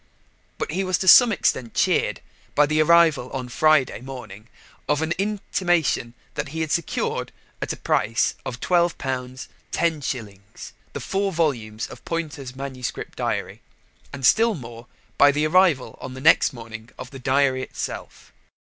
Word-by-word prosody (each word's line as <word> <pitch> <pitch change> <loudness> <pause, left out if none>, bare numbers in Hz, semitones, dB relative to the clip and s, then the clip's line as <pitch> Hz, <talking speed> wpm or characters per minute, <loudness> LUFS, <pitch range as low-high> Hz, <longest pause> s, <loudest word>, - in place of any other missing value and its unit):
But - - -3
he 190 +4 -1
was 185 -2 +1
to 190 - -4
some 245 +5 +9
extent 130 - 0
cheered - - +1 0.3
by 150 - +5
the 155 +1 +2
arrival 160 -5 +4
on 130 -2 -3
the 125 - -12
Friday 155 -6 +3
morning 120 -5 -9 0.4
of 150 +1 +2
an 160 - -2
intimation 175 - 0 0.2
that 145 +1 -3
he 160 +3 -5
had 160 -2 -2
secured 170 0 -1 0.3
at - - -3
the - - -3
price 115 +2 +1
of 120 -1 -6
£12 175 +1 +2 0.7
10s. 115 - -3 0.2
the - - -4
four 195 0 -1
volumes 120 - -1
of - - -12
Poynter's 150 -6 -5
manuscript 130 -2 -6
diary, - - -3 0.5
and 135 -2 -4
still 225 - +4
more 120 -4 -10 0.3
by 145 0 +7
the 150 +2 0
arrival 165 -5 +3
on 130 0 -7
the - - -7
next 155 +1 +5
morning 115 -2 -10
of 125 - -9
the 135 - -9
diary 130 0 +2
itself. - - -7
145 Hz, 155 wpm, -23 LUFS, 125-165 Hz, 0.7 s, some